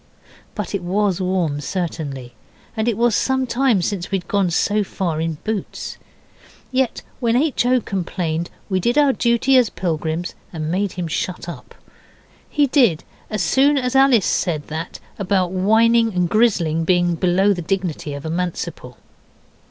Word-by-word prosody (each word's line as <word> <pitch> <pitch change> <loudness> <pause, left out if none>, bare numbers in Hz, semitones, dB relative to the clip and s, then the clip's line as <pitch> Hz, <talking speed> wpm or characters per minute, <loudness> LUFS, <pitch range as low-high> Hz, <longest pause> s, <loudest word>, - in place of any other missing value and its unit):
But 210 -2 -4
it 200 - -1
WAS 190 +1 0
warm 180 -6 0
certainly, 145 -8 -4 0.4
and 220 0 -1
it 230 -4 +1
was 235 -1 +3
some 265 -1 +1
time 245 -6 +2
since 180 -1 -2
we'd 190 -3 -2
gone 200 -3 +1
so 205 +5 +1
far 170 -5 -2
in 165 -1 -2
boots. 215 -2 -4 0.7
Yet 260 -1 0 0.2
when 235 -2 +1
H. 265 -2 +2
O. 255 0 +4
complained 170 -4 -3 0.2
we 190 -2 0
did 240 +8 0
our 285 -2 +5
duty 240 +3 +3
as 240 -4 +2
pilgrims 165 0 -3 0.2
and 155 -2 -4
made 195 +2 -1
him 180 -2 -4
shut 175 +2 -3
up. 170 - -9 0.7
He 295 -1 +3
did 245 - +3 0.3
as 215 -4 -1
soon 275 - +3
as 250 -1 -1
Alice 265 -7 +5
said 155 -5 -1
that 160 +3 -5 0.2
about 185 -2 +1
whining 225 +3 +3
and 180 -1 +2
grizzling 175 -7 +2
being 175 0 +2
below 185 +4 +2
the 180 - -4
dignity 170 -5 -2
of 140 +2 -8
a - - -3
Manciple. 170 -7 -4
190 Hz, 160 wpm, -20 LUFS, 170-230 Hz, 0.7 s, our